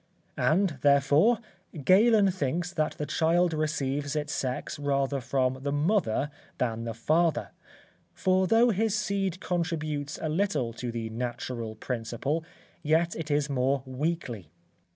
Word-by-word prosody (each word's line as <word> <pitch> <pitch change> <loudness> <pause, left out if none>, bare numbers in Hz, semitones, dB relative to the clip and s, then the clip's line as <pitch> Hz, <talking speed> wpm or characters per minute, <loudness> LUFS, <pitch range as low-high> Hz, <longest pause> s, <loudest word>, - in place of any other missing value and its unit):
And, 165 -3 +2
therefore, 145 - +4 0.5
Galen 205 - +5
thinks 175 +1 -2
that 155 -3 0
the 150 - -4
child 170 +2 +2
receives 145 -2 -1
its 150 0 -2
sex 130 +2 -3
rather 140 -1 0
from 130 +1 0
the 140 +1 -2
mother 145 - +1 0.3
than 115 -2 -1
the 115 -1 -4
father, 160 +7 +1 0.6
for 185 0 +2
though 230 +3 +5
his 220 +1 +1
seed 195 -3 -1
contributes 155 -5 -2
a 160 - -2
little 155 - 0
to 120 +1 -4
the 115 -1 -4
natural 120 -1 -4
principle, 125 +7 -3 0.4
yet 165 +2 +2
it 160 -1 -5
is 145 -1 +1
more 135 -1 0
weakly. 130 - -3
150 Hz, 130 wpm, -28 LUFS, 130-175 Hz, 0.6 s, Galen